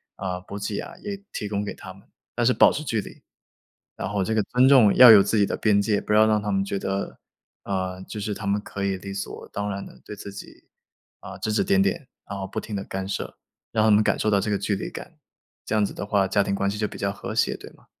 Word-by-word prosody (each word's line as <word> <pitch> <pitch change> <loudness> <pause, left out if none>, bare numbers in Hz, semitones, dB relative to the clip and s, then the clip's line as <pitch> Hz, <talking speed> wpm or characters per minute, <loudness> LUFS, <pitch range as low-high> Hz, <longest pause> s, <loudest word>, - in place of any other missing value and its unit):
啊， 90 -2 -4
补 100 +2 -9
给 100 0 -3
啊 - - -8
也 200 -1 -5
提 105 - -4
供 100 -1 -1
给 - - -4
他 95 - -10
们， 100 - -20 0.3
但 120 - -1
是 125 - +4
保 - - +6
持 155 - -4
距 115 -6 -1
离。 - - -12 0.7
然 - - -4
后 100 -1 -1
这 110 - -1
个 110 - +3
尊 125 +5 +3
重 125 -7 +6
要 125 -2 +10
有 100 -2 +9
自 110 - 0
己 100 - +4
的 - - -2
边 100 -2 +3
界， 100 0 +1
不 - - -5
要 110 +1 +6
让 105 -1 +2
他 105 0 -2
们 95 0 +1
觉 100 - -2
得， 95 +1 -3 0.5
呃， 95 -1 -3
就 105 - -7
是 105 0 -3
他 105 - -7
们 100 +1 +1
可 100 -1 -6
以 95 -1 0
理 100 +1 -7
所 100 - -6
当 105 0 -2
然 100 0 -4
地 - - -16
对 105 - -8
自 100 - -8
己， - - -12 0.6
啊， - - -9
指 110 - -2
指 110 - +2
点 195 0 +3
点， 170 -8 -1 0.2
然 100 - -5
后 95 - -4
不 110 - -4
停 110 - -6
地 100 - -3
干 95 0 -5
涉。 - - -5 0.3
让 110 -1 +2
他 - - +4
们 105 +1 +5
感 - - +1
受 110 - +1
到 100 - +3
这 105 - -2
个 100 - +1
距 100 +1 -1
离 - - -5
感， - - -10 0.5
这 - - -3
样 105 -1 +3
子 - - -6
的 - - -5
话， 100 -1 +2
家 100 +1 +2
庭 100 - -2
关 100 0 0
系 105 - -4
就 105 - 0
比 - - -9
较 100 - -1
和 100 - -7
谐， - - +2
对 - - -11
吗？ - - -23
100 Hz, 300 characters per minute, -24 LUFS, 100-110 Hz, 0.7 s, 要